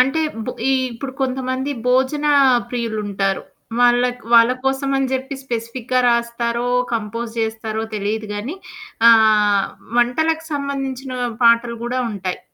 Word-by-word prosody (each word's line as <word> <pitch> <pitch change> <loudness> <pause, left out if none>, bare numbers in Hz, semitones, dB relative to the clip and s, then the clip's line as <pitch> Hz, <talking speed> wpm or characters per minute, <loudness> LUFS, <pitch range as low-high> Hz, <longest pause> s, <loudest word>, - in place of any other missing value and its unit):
అంటే 270 +5 +3 0.3
బొ 250 - -2 0.2
ఈ - - +3 0.2
ఇప్పుడు 260 +3 -6
కొంతమంది 260 +1 -2 0.2
భోజన 265 +4 +2 0.4
ప్రియులుంటారు. 210 -5 -2 0.4
వాళ్ళక్ 245 0 +3
వాళ్ళకోసమని 265 +3 +2
జెప్పి 265 +2 -3
స్పెసిఫిక్‌గా 240 +1 -2
రాస్తారో, 235 0 0 0.2
కంపోజ్ 230 +1 -3
జేస్తారో 220 0 -2
తెలీదుగానీ 215 - -3 0.5
ఆహ్, 215 -3 +5 0.3
వంటలకు 320 +7 +1
సంబంధించిన 270 -2 -3 0.3
పాటలు 235 0 +4
గూడా 255 +1 -1
ఉంటాయి. 185 -3 -4
240 Hz, 100 wpm, -20 LUFS, 225-265 Hz, 0.5 s, ఆహ్